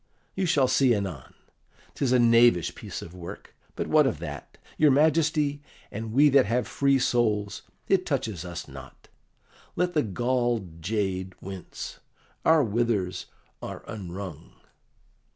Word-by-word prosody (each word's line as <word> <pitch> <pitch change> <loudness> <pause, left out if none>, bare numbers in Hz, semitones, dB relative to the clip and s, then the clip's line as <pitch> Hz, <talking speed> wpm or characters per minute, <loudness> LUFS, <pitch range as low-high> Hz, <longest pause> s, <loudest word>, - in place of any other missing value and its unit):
You 190 -1 -1
shall 140 -5 +3
see 130 -2 +3
anon. 95 -10 -5 0.6
'Tis 135 -3 -1
a 130 - +5
knavish 115 -6 +4
piece - - -7
of 85 - -11
work; 90 -2 -10 0.2
but - - -2
what - - +4
of - - -1
that? - - -8 0.2
Your 150 - +5
Majesty 150 0 +2 0.3
and 110 +1 -5
we 140 +6 +5
that 135 -5 +5
have 120 +3 0
free 140 -1 +2
souls, 105 -5 0 0.3
it 190 -2 +3
touches 115 - -2
us 90 -1 -7
not; - - -13 0.7
let 180 0 0
the 150 - +3
galled 120 - -1
jade 95 -1 -2
wince, 95 -2 -8 0.4
our 160 -2 +5
withers 110 -5 -1 0.3
are - - -7
unwrung." 90 -5 -7
115 Hz, 135 wpm, -26 LUFS, 95-140 Hz, 0.7 s, a